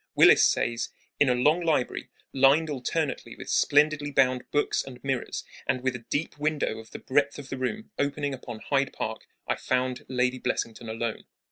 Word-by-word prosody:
Willis - - +7
says: 120 0 +1 0.3
In 145 - +5
a 125 - +3
long 150 +8 +3
library, 155 -7 0 0.2
lined 140 +4 +4
alternately 145 +3 -2
with - - -7
splendidly 150 0 +3
bound 130 -3 +2
books 145 - +1
and 130 -2 -10
mirrors, 135 -2 -2 0.2
and 130 -1 0
with 130 -1 0
a 115 -2 -9
deep 145 0 -2
window 150 -7 0
of 110 - -12
the - - -8
breadth 140 +1 +1
of 140 -2 -9
the 135 - -4
room 210 +13 -3
opening 145 0 0
upon 120 -3 -8
Hyde 140 -1 0
Park, - - -5 0.2
I - - 0
found 130 0 -1
Lady 125 0 +1
Blessington 115 -1 -3
alone. 115 0 -3
135 Hz, 175 wpm, -27 LUFS, 125-145 Hz, 0.3 s, Willis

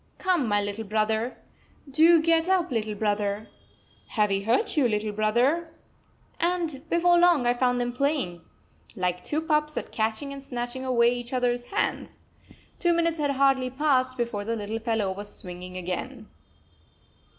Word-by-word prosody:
"Come, 360 - +1
my 205 -1 +2
little 205 +2 -3
brother! 220 +3 -1 0.5
Do 320 +5 +6
get 330 +1 +3
up, 360 -4 +2
little 215 -3 -1
brother! 205 0 -1 0.6
Have 210 -2 +1
we 195 0 +1
hurt 225 +5 +1
you, 285 -5 +4
little 210 0 -1
brother?" 250 +11 +1 0.6
And 335 -5 -1
before 345 +1 +4
long 345 -7 +4
I 240 - +4
found 245 0 +1
them 245 0 -1
playing, 250 - -1 0.5
like 180 -2 -2
two 305 +1 -1
pups, 300 -2 0
at - - -4
catching 225 +6 -2
and 275 - -8
snatching 245 0 -5
away 240 -2 +3
each 245 +1 -6
other's 245 -1 0
hands! 410 - -2 0.6
Two 345 -2 +3
minutes 335 -1 +1
had 290 -1 +1
hardly 270 -2 +2
passed 260 -2 +1
before 235 -4 -2
the 230 +2 -2
little 215 +1 -4
fellow 225 -4 -1
was 205 +2 -7
swinging 180 0 -8
again. 210 +6 -5
245 Hz, 155 wpm, -26 LUFS, 215-300 Hz, 0.6 s, Do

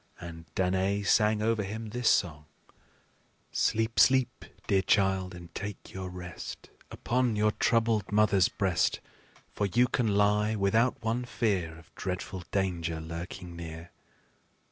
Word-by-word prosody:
And 85 -1 -9
Danaë 95 +2 +1
sang 105 0 +3
over 115 -1 +1
him 110 +3 -5
this 125 0 +1
song: 80 -9 +1 1.1
"Sleep, 110 +1 +1
sleep, 130 -2 +3 0.2
dear 95 -1 +3
child, 95 -2 +1
and 85 -1 -12
take 100 -1 -7
your 95 -1 -5
rest 90 -2 -8 0.2
Upon 125 -2 0
your 105 +1 +3
troubled 115 -3 +1
mother's 105 -3 +4
breast; 95 -4 +1 0.5
For 100 - 0
you 120 +5 +3
can 125 -2 0
lie 105 +1 +3
without 110 +5 +1
one 115 +2 0
fear 105 -8 -1
Of 80 - -18
dreadful 90 0 -4
danger 85 -4 -1
lurking 85 +2 -7
near. 85 0 -8
100 Hz, 130 wpm, -29 LUFS, 90-110 Hz, 1.1 s, mother's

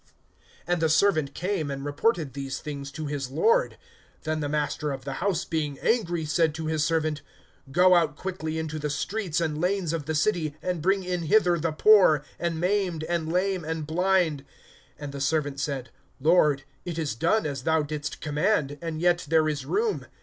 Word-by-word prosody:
(21)And 175 -1 +1
the 160 -1 +2
servant 155 -4 +2
came, 180 -4 -2
and 140 0 -5
reported 150 - 0
these 135 -1 -4
things 140 -2 -6
to 155 +1 -6
his 140 -3 -3
lord. 465 - +2 0.5
Then 155 -1 -1
the 145 -1 -2
master 150 0 -1
of 135 -1 -6
the 135 - -3
house, 195 -3 0
being 150 -4 -2
angry, 175 -9 0
said 155 0 +1
to 160 0 -4
his 155 -1 0
servant: 155 -2 0 0.5
Go 180 +4 +5
out 165 -4 +3
quickly 160 -3 -4
into 155 -1 -3
the 150 0 -2
streets 180 +2 -2
and 155 -2 -1
lanes 180 -2 0
of 160 -4 -3
the 160 - -1
city, 155 -3 0
and 180 -3 -3
bring 195 +3 +2
in 180 -1 -2
hither 175 0 +3
the 165 +1 0
poor, 160 -4 +5 0.2
and 170 -2 -1
maimed, 180 -3 0
and 165 -1 -2
lame, 185 0 0
and 160 0 -3
blind. 170 -3 +1 0.6
(22)And 145 -1 -6
the 140 0 -6
servant 145 -1 0
said: 140 -2 -3 0.3
Lord, 150 -2 +3 0.2
it 170 -2 -5
is 155 -6 -1
done 170 - +1
as 140 -3 -3
thou 160 +2 +2
didst 150 0 -5
command, 150 -1 0
and 165 -2 -4
yet 175 -2 +2
there 160 -1 +4
is 145 -3 -3
room. 440 0 0
160 Hz, 185 wpm, -26 LUFS, 150-180 Hz, 0.6 s, Go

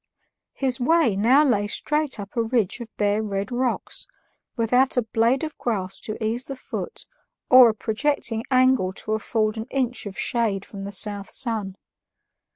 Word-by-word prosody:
His 265 -1 +1
way 300 -4 +3
now 250 +9 +4
lay 205 -6 +2
straight 300 +3 -1
up 200 +2 -8
a 235 - +2
ridge 225 -2 0
of 235 -2 -8
bare 205 +1 +1
red 200 0 -3
rocks, 250 - -2 0.5
without 250 +3 +2
a 245 - +3
blade 230 +5 +1
of 310 -1 -4
grass 195 -5 -2
to 215 - -5
ease 235 +4 -1
the 275 - -6
foot 255 - -6 0.5
or 255 -2 +9
a 220 - -2
projecting 230 0 -1
angle 255 -7 +3
to 215 - -6
afford 215 0 -1
an 220 - -4
inch 250 -4 -2
of 195 - -8
shade 215 -5 -1
from 195 -1 -8
the 200 - -5
south 205 0 -1
sun. 220 -7 -1
230 Hz, 165 wpm, -24 LUFS, 205-255 Hz, 0.5 s, or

